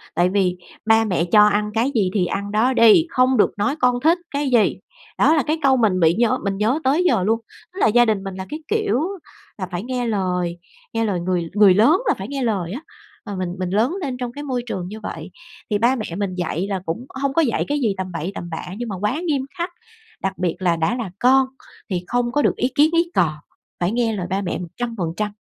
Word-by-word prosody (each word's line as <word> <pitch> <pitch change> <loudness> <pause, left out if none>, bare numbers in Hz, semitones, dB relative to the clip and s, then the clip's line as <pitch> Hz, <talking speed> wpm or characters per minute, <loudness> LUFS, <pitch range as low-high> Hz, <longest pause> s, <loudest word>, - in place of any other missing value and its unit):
tại 175 +2 +3
vì: 185 -2 +1 0.3
"Ba 225 0 +4
mẹ 180 -5 0
cho 210 +4 +6
ăn 210 0 0
cái 235 +5 +1
gì 200 -5 +2
thì 190 -4 +2
ăn 200 +3 -3
đó 230 +5 +2
đi, 230 +8 +6
không 255 -3 +3
được 210 - +4
nói 275 +8 0
con 250 -2 +2
thích 330 +3 +4
cái 285 -1 -1
gì." 235 -4 +3 0.4
Đó - - +5
là 300 - +2
cái 310 +2 0
câu 265 -2 +4
mình 210 -6 +2
bị 165 -1 +4
nhớ 230 +3 +2
mình 200 -1 -1
nhớ 225 +8 +1
tới 285 +7 +2
giờ 225 - +2
luôn, 225 +4 +1 0.3
tức 380 - -8
là - - +4
gia 240 +2 +5
đình 215 -4 0
mình 195 -1 -6
là 190 0 -6
cái 305 - -5
kiểu 430 - +1 0.6
là 185 -3 -4
phải 175 +2 -3
nghe 250 0 -2
lời, 180 -5 -1 0.4
nghe 225 0 0
lời 195 -4 -1
người 175 -1 -1
người 205 -2 +6
lớn, 235 - +4
là - - +4
phải - - -6
nghe 275 -2 -3
lời 195 -7 -1
á 250 +8 -5 0.4
và 205 -2 -5
mình 185 -1 -3
mình 185 -1 -2
lớn 220 - +1
lên 265 -5 -3
trong 245 -1 -4
cái 290 +4 -8
môi 255 -4 -2
trường 185 -7 -4
như 215 +3 -8
vậy, - - -7 0.4
thì 210 - +1
ba 240 +5 +3
mẹ 220 -5 -4
mình 200 -3 -2
dạy 175 +1 -2
là 195 -2 -1
cũng 170 +10 -4 0.2
hông 275 -1 0
có 330 - +3
dạy 250 -8 0
cái 290 +1 0
gì 225 -7 +1
tầm 185 -1 -4
bậy 170 +2 -4
tầm 175 - -6
bạ 160 - -5
nhưng 240 0 -4
mà 200 - -3
quá 215 +10 0
nghiêm 280 -4 0
khắc, 345 +1 -2 0.5
đặc 195 0 -2
biệt 180 -2 -1
là 180 -2 +2
đã 165 +8 0
là 230 -7 -4
con 260 +1 +4 0.4
thì 180 -3 -2
không 245 +2 0
có 295 - +1
được - - +2
ý 250 - 0
kiến 300 +2 +5
ý 335 +1 +2
cò, 165 -4 +2 0.5
phải 175 +2 0
nghe 230 -1 0
lời 180 -3 -4
ba 190 +2 -1
mẹ 195 - -3
100%, 205 0 -4
215 Hz, 250 wpm, -21 LUFS, 185-255 Hz, 0.6 s, cho